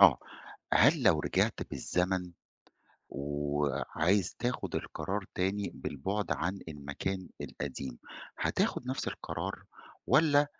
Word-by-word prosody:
آه 90 -10 +9 0.5
هل - - +6
لو - - +5
رجِعت - - +1
بالزمن 90 -1 0 0.8
وعايز 75 +5 0
تاخد 125 0 -2
القرار 95 +6 -2
تاني 100 +2 0
بالبُعد 95 +9 -2
عن 95 +3 -1
المكان 80 +6 -4
القديم، 65 -3 -5 0.4
هتاخد 125 - +1
نفس 130 - -1
القرار؟ - - -4 0.4
والَّا 145 +1 +5
90 Hz, 95 wpm, -32 LUFS, 75-100 Hz, 0.8 s, آه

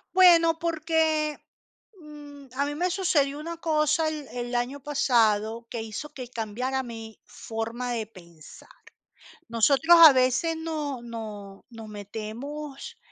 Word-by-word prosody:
Bueno, 335 -3 +6
porque, 315 -2 0 0.6
mm, 290 -2 -12
a 280 +2 +1
mí 290 0 -4
me 355 +4 0
sucedió 300 -7 +1
una 335 +2 -6
cosa 310 -1 +1
el 305 -3 -4
el 245 0 -4
año 245 +4 -2
pasado 230 -5 +1
que 230 - -4
hizo 225 +7 -6
que 255 -4 -7
cambiara 250 +3 -3
mi 225 -2 -9
forma 230 +2 -5
de 225 -3 -3
pensar. 170 -6 -16 0.8
Nosotros, 275 +9 +4
a 320 -2 +12
veces, 260 +6 +1
nos 305 -6 -4
nos 215 -4 -8
nos 225 -2 -10
metemos 270 - -7
270 Hz, 130 wpm, -26 LUFS, 225-310 Hz, 0.8 s, a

